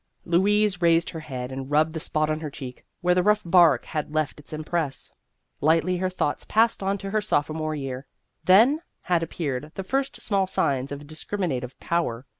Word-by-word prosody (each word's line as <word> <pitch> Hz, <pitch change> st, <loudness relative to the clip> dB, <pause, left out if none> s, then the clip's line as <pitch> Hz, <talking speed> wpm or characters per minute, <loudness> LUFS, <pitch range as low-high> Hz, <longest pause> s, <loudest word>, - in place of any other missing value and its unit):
Louise 195 Hz, +2 st, +2 dB
raised 170 Hz, 0 st, +3 dB
her 165 Hz, -, -6 dB
head 130 Hz, -4 st, -6 dB
and 135 Hz, 0 st, -6 dB
rubbed 155 Hz, +2 st, +2 dB
the 160 Hz, -, -3 dB
spot 155 Hz, 0 st, 0 dB
on 155 Hz, 0 st, -1 dB
her 155 Hz, -1 st, -5 dB
cheek 130 Hz, -3 st, -9 dB, 0.2 s
where 180 Hz, 0 st, +3 dB
the 180 Hz, -, +3 dB
rough 210 Hz, +3 st, +3 dB
bark 170 Hz, -6 st, +5 dB
had 150 Hz, 0 st, -4 dB
left 155 Hz, -1 st, -1 dB
its 150 Hz, -, -13 dB
impress. 155 Hz, -2 st, -2 dB, 0.5 s
Lightly 165 Hz, +4 st, +3 dB
her 185 Hz, +1 st, 0 dB
thoughts 185 Hz, -5 st, -2 dB
passed 225 Hz, 0 st, +2 dB
on 195 Hz, +1 st, 0 dB
to 195 Hz, 0 st, -6 dB
her 215 Hz, 0 st, +1 dB
sophomore 155 Hz, -4 st, -1 dB
year. 135 Hz, -2 st, -5 dB, 0.4 s
Then 235 Hz, -, +5 dB, 0.2 s
had 175 Hz, -2 st, +1 dB
appeared 150 Hz, -3 st, -3 dB
the 195 Hz, -, -4 dB
first 270 Hz, +7 st, -2 dB
small 195 Hz, -3 st, +1 dB
signs 135 Hz, -7 st, 0 dB
of 145 Hz, +1 st, -6 dB
dis 155 Hz, +2 st, -9 dB
criminative 135 Hz, -11 st, -3 dB
power. 135 Hz, -8 st, -1 dB
160 Hz, 190 wpm, -25 LUFS, 145-185 Hz, 0.5 s, bark